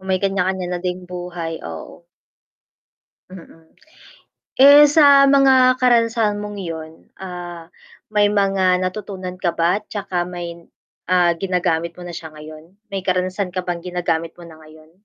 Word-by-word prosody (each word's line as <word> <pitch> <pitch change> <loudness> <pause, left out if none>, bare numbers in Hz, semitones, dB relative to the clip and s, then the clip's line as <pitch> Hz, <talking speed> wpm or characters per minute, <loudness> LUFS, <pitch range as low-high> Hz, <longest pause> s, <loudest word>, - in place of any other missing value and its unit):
May 190 0 -1
kanya-kanya 190 -1 -1
na 180 - -2
ding 180 0 -2
buhay, 175 -2 -6 0.2
oo. 85 - -10 1.2
Mm. 165 -3 -15 0.9
Eh, 285 +2 +8
sa 285 -2 +6
mga 265 -2 +5
karanasan 230 -4 +2
mong 205 -1 -7
'yon, 160 -3 -7 0.3
ah, 175 -2 -8 0.5
may 205 -1 +3
mga 195 -3 +2
natutunan 185 -1 -5
ka 180 -1 -1
ba, 175 +5 +1
'tsaka 195 -4 -4
may 170 -1 -8 0.5
ah, 180 -1 +4
ginagamit 175 -3 -1
mo - - -9
na 175 - -7
siya 160 -1 -8
ngayon? 155 +3 -13 0.2
May 195 -1 -4
karanasan 185 +1 -2
ka 185 - -2
bang 175 -1 -4
ginagamit 170 -2 -2
mo - - -12
na 160 -1 -14
ngayon? 155 0 -17
180 Hz, 140 wpm, -20 LUFS, 170-205 Hz, 1.2 s, Eh